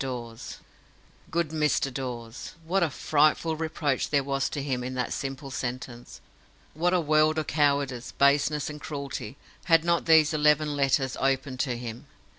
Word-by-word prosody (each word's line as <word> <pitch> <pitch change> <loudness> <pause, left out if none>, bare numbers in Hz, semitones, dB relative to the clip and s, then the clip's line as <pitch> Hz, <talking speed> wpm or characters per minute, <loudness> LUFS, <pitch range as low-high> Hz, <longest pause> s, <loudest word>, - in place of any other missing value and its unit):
DAWES. 120 -3 -6 0.7
"Good 170 -2 0
Mr. 150 -3 0
Dawes"! 120 -2 -6
What 190 +4 +1
a 170 - +2
frightful 155 +3 +2
reproach 155 -4 -1
there 140 -2 +2
was 135 0 -1
to 140 - -4
him 130 -3 -2
in 130 +1 -5
that 125 - -2
simple 135 0 -5
sentence! 125 -1 -6 0.5
What 175 +3 +1
a - - +3
world 155 0 +3
of 155 - 0
cowardice, 140 -4 0
baseness, 140 +1 +2
and 150 -1 -7
cruelty, 140 -6 -6 0.3
had 165 -2 +5
not 170 0 +1
those 160 -1 +5
eleven 150 0 +3
letters 135 -2 +1
opened 135 -1 0
to 125 -4 -1
him! 120 +3 -7
140 Hz, 155 wpm, -27 LUFS, 130-155 Hz, 0.7 s, had